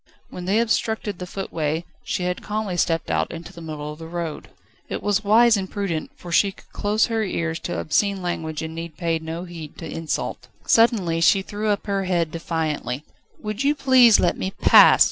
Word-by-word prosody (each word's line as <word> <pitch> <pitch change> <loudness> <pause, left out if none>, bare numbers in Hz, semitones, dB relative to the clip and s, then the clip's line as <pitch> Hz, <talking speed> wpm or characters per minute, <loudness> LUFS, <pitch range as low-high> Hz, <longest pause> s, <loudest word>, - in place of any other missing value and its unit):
When 180 - -7
they 195 +3 +2
obstructed 220 -3 0
the 180 - -5
footway, 165 -4 -3 0.2
she 180 - -2
had 180 0 -2
calmly 210 -3 -3
stepped 165 -1 0
out - - 0
into 165 0 -8
the 170 - -11
middle 150 -2 -6
of 150 - -14
the 165 - -8
road. 170 -2 -5 0.4
It - - -4
was 205 +1 +1
wise 225 +3 +5
and 190 -2 -3
prudent, 190 -7 -3
for 175 - -10
she 195 +3 +3
could - - -20
close 210 +2 +1
her 225 -2 -1
ears 170 -4 -2
to 90 - -4
obscene 195 - +1
language 160 -3 -3
and 160 0 -5
need 165 -1 -7
pay 165 -2 0
no 160 +2 -5
heed 170 -4 -9
to 165 - -7
insult. 160 0 -4 0.2
Suddenly 200 -8 +3
she 190 +3 +4
threw 210 +2 -4
up 205 -1 0
her 200 -2 -1
head 170 -3 0
defiantly. 155 -5 -3 0.4
"Will 215 0 -4
you 280 +7 +1
please 260 -5 +6
let 175 - +2
me 190 - -1
pass?" - - +7
180 Hz, 200 wpm, -23 LUFS, 165-205 Hz, 0.4 s, pass